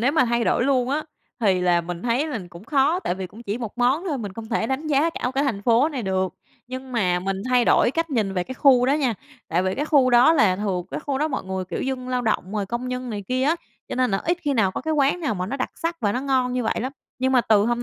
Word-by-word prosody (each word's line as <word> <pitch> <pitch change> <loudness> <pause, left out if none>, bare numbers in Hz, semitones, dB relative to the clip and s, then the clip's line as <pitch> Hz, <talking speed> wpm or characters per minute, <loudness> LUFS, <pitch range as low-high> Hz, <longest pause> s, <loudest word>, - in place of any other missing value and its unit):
nếu 255 +5 +2
mà 315 -5 +4
thay 235 0 +1
đổi 240 - +2
luôn 260 -2 +2
á 300 +3 -1 0.4
thì 195 -5 +3
là 175 -1 +3
mình 170 0 -6
thấy 245 +5 +1
là 290 -7 -3
cũng 170 +3 -12
khó, 290 +7 +2
tại 180 - -1
vì 190 0 -5
cũng 215 +6 -13
chỉ 210 0 -3
một 235 -1 -6
món 260 +8 +2
thôi, 285 -5 -1
mình 205 -4 -5
không 220 +2 -8
thể 220 - 0
đánh 265 +5 -2
giá 300 +2 +2
cả 250 -6 -3
cái 275 +2 +2
thành 220 -8 -2
phố 235 +6 +4
này 275 -6 -4
được. 190 -2 -1 0.3
Nhưng 255 +1 -7
mà 180 -7 +1
mình 195 +1 -3
thay 250 -1 +4
đổi - - +4
cách 330 +3 -2
nhìn 215 -7 0
về 180 -1 0
cái 260 - -7
khu 255 -3 +5
đó 270 - +3
nha, 270 -6 +1 0.3
tại 175 +3 +1
vì 185 0 0
cái 290 - -1
khu 280 -4 +4
đó 245 +6 +6
là 215 - +3
thường 190 -3 -2
cái - - -4
khu 280 -3 -2
đó 305 +2 +1
mọi 270 - -3
người, 190 0 -3
kiểu, 185 - -5
dân 260 -1 -3
lao 250 -1 0
động 215 -4 -1
rồi 205 -2 -2
công 240 +4 -3
nhân 250 0 -4
này 205 -2 -4
kia 255 +1 0
á, 305 +5 +2 0.3
cho - - -4
nên 255 -1 +1
là 195 - +1
ít 345 +1 +1
khi 290 -3 0
nào 210 -6 +3
có - - -4
cái 315 - -2
quán 285 +4 +2
nào 290 -9 -1
mà 180 -1 -3
nó 260 +8 -3
đặc 255 - -2
sắc 335 0 -3
và 205 -3 +1
nó 250 - -1
ngon 260 -2 +1
như 250 0 -1
vậy 220 - -1
lắm, 260 +4 -3 0.3
nhưng 260 +1 +1
mà 255 - +5
từ 215 -3 +3
hôm 240 0 0
250 Hz, 300 wpm, -23 LUFS, 205-275 Hz, 0.4 s, đó